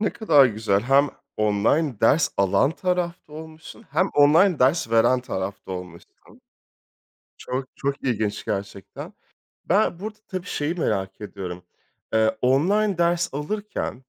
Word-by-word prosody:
ne 210 - +1
kadar 150 - +5
güzel. 110 -3 0
Hem 135 +3 +3 0.3
online 110 +6 +1
ders 145 +8 +4
alan 100 +7 +2
tarafta 175 -2 -3
olmuşsun 160 +7 -11
hem 185 - +1
online 155 +5 +5
ders 130 -1 +2
veren 115 +3 +3
tarafta 95 -5 -5
olmuşsun. 90 -2 -9 1.3
Çok, 130 +1 -4
çok 140 0 -3
ilginç 110 -5 -2
gerçekten. 100 -1 -6 0.5
Ben 195 -2 +1
burada, 215 +1 -6
tabii, 185 -1 -5
şeyi 150 +3 -2
merak 95 - -2
ediyorum. 95 -4 -7 0.5
Eee, 110 0 +2
online 185 +10 +2
ders 170 -2 +1
alırken 150 - -4
140 Hz, 125 wpm, -23 LUFS, 105-170 Hz, 1.3 s, kadar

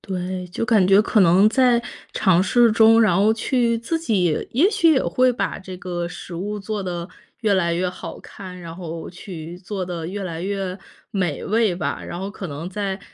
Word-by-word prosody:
对， 185 -1 -4
就 180 - -3
感 215 -6 +4
觉 195 +1 +6
可 215 0 +2
能 185 +4 +6
在 245 -1 +3 0.3
尝 185 -2 +3
试 240 +2 +4
中， 225 0 +6
然 210 -6 +4
后 210 +3 +4
去 235 0 +1
自 280 +9 -2
己 190 - 0
也 335 - +4
许 335 -7 +4
也 265 - +2
会 255 0 +2
把 - - -2
这 190 -1 -9
个 175 -1 -4
食 175 0 -8
物 205 +4 -4
做 205 0 -4
得 175 -1 -4 0.3
越 215 -4 +2
来 170 -3 +1
越 180 +2 0
好 180 - -8
看， 185 -2 -10
然 165 -1 -8
后 165 -2 -6
去 175 -2 -9
做 195 0 -5
得 170 -2 -5
越 200 +3 -5
来 170 -2 -5
越 195 -1 -3 0.3
美 180 -7 -2
味 215 -3 +2
吧。 180 - -3
然 175 - -6
后 195 +1 -4
可 195 -2 -7
能 150 +5 -6
在 195 0 -3
190 Hz, 215 characters per minute, -22 LUFS, 180-220 Hz, 0.3 s, 觉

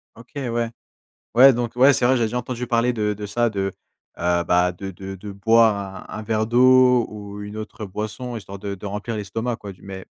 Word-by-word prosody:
OK, 115 +2 -16 0.2
ouais. 115 0 -1 0.7
Ouais, 135 +2 +8
donc 120 -1 -3
ouais, 135 +3 +6
c'est 120 - +1
vrai, 130 +1 +4
j'ai 115 - +1
déjà 115 +3 -1
entendu 125 0 -4
parler 120 0 +2
de 105 -2 0
de 105 0 -7
ça 120 +3 +1
de, 95 -1 -2 0.5
heu, 85 0 +1
bah, 90 0 +3
de 95 +2 -7
de 95 +2 -8
de 100 +2 -8
boire 100 -2 +2
un - - -6
un - - -5
verre 110 0 0
d'eau 125 0 +5
ou 105 -1 -8
une 105 +1 -8
autre 110 0 -7
boisson 110 +5 -5
histoire 100 -2 -9
de 100 0 -4
de 100 - -11
remplir 105 +3 -4
l'estomac 110 +3 -3
quoi 100 -3 -9
du - - -22
mais 95 -1 -8
110 Hz, 220 wpm, -22 LUFS, 100-120 Hz, 0.7 s, Ouais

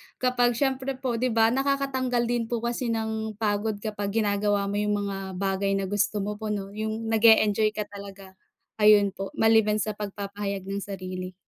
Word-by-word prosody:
kapag 245 -1 +2
siyempre 265 0 -1
po, 255 -3 -2
'di 250 -2 0
ba, 225 0 +5
nakakatanggal 265 -2 0
din 235 -2 0
po 235 -1 -3
kasi 240 +1 -2
ng 220 -1 -2
pagod 210 0 -1
kapag 205 -1 -3
ginagawa 200 -1 +1
mo 205 - -1
'yong 210 0 +1
mga 200 -1 -3 0.2
bagay 195 +1 0
na 195 - -1
gusto 205 +1 0
mo 210 +1 -4
po, 220 - -4
'no, 200 -2 -3
'yong 220 +1 -3
nag-e-enjoy 215 -1 +4
ka 210 - -1
talaga. 195 -1 -11 0.4
Ayun 210 -2 +6
po 195 0 -7
maliban 220 -1 +4
sa 215 - -2
pagpapahayag 200 -1 -5
ng 195 +1 -4
sarili. 185 -2 -6
210 Hz, 175 wpm, -26 LUFS, 200-230 Hz, 0.4 s, Ayun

